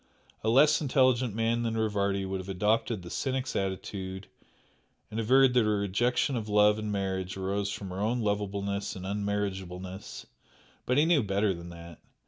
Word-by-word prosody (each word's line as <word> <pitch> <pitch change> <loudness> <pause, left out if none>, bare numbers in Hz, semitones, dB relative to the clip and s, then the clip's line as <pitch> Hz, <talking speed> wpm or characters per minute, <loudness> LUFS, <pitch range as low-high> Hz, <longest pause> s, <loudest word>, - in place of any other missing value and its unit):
A 110 - +1
less 145 +7 +5
intelligent 130 -5 +2
man 115 +1 +1
than 115 -1 -1
Rivardi 100 -3 0
would 95 0 -3
have 95 +1 -8
adopted 105 +1 0
the 85 - -9
cynic's 130 -1 -2
attitude 95 0 -4 0.9
and 110 - -3
averred 130 +3 +5
that 125 -2 +4
her 105 -1 +1
rejection 120 +7 +1
of 110 -3 -3
love 105 0 +4
and 105 -1 -3
marriage 95 -1 -2
arose 100 +1 -1
from 100 -2 -6
her 95 - -5
own 115 +3 0
unlovableness 100 -1 -2
and 95 -1 -7
unmarriageableness, 95 -2 -4 0.6
but 125 - +2
he 150 - +5
knew 165 -4 +4
better 100 -1 +1
than 85 0 -9
that. 85 -1 -11
105 Hz, 165 wpm, -29 LUFS, 95-115 Hz, 0.9 s, less